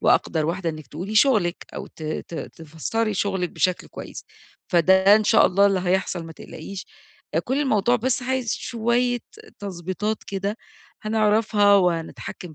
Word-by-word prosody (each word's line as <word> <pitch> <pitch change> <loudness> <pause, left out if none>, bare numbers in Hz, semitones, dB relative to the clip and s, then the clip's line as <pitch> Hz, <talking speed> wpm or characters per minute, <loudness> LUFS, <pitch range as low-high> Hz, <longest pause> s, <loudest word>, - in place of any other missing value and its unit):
وأقدر 155 -2 +2
واحدة 170 +1 -1
إنِّك 155 -1 -9
تقولي 180 +8 -6
شغلِك 215 -8 +3
أو - - -6
ت - - -14
ت 155 +2 -5
تفسري 165 +9 -3
شغلِك 190 -2 -1
بشكل 180 +3 0
كويس، - - -9 0.4
فده 190 +3 +5
إن 215 - 0
شاء 210 - +5
الله 200 +2 +4
اللي 195 -2 +2
هيحصل 180 -1 0
ما 165 - -9
تقلقيش، 185 +4 -9 0.6
كل 265 +3 0
الموضوع 245 -3 +2
بس 250 +2 -1
عايز 255 -2 -1
شوية 240 +1 0 0.4
تضبيطات 195 +2 -4
كده 200 +2 -3 0.5
هنعرفها 215 -1 +3
وهنتحكّم 175 -2 -1
195 Hz, 140 wpm, -23 LUFS, 175-220 Hz, 0.6 s, فده